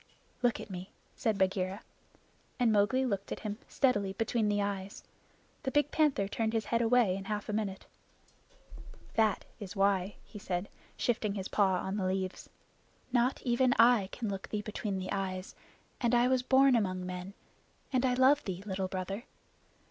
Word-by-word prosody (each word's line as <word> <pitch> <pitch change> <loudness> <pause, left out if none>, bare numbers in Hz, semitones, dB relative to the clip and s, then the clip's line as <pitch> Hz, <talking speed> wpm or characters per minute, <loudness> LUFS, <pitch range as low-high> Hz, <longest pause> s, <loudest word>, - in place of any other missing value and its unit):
"Look 245 -2 +2
at 205 - -8
me," 185 +1 -6 0.3
said 220 -3 0
Bagheera. 190 +1 0 0.8
And 240 -2 +4
Mowgli 220 +6 +3
looked 200 -5 -2
at - - -4
him 210 0 -4
steadily 205 -8 +1
between 225 +1 0
the 205 0 +1
eyes. 200 -1 -3 0.6
The 270 - -2
big 295 +1 +2
panther 290 -11 +2
turned 220 +2 -1
his 225 -2 0
head 230 0 +1
away 230 -5 +4
in 195 0 -6
half 210 0 -3
a - - -1
minute. 205 -3 -2 1.3
"That 220 -2 +2
is 200 -1 -7
why," 195 0 +2
he 210 - -10
said, 180 0 -3 0.3
shifting 220 -4 0
his 190 -1 -3
paw 195 -3 +3
on 190 +2 -2
the 190 -2 0
leaves. 185 0 -3 0.6
"Not 245 +1 +2
even 250 +1 +3
I 230 -5 +5
can 235 - -4
look 195 -1 -4
thee 210 -1 -2
between 210 -2 -3
the 185 0 -4
eyes, 190 -1 -3 0.5
and 240 -1 +2
I 240 +1 +4
was 260 -1 +3
born 265 +1 +5
among 185 -5 0
men, 180 +2 -6 0.6
and 255 -1 +2
I 250 -1 +2
love 265 +3 +5
thee, 190 -1 -5
Little 190 -2 -2
Brother. 195 +5 -4
205 Hz, 170 wpm, -31 LUFS, 190-240 Hz, 1.3 s, I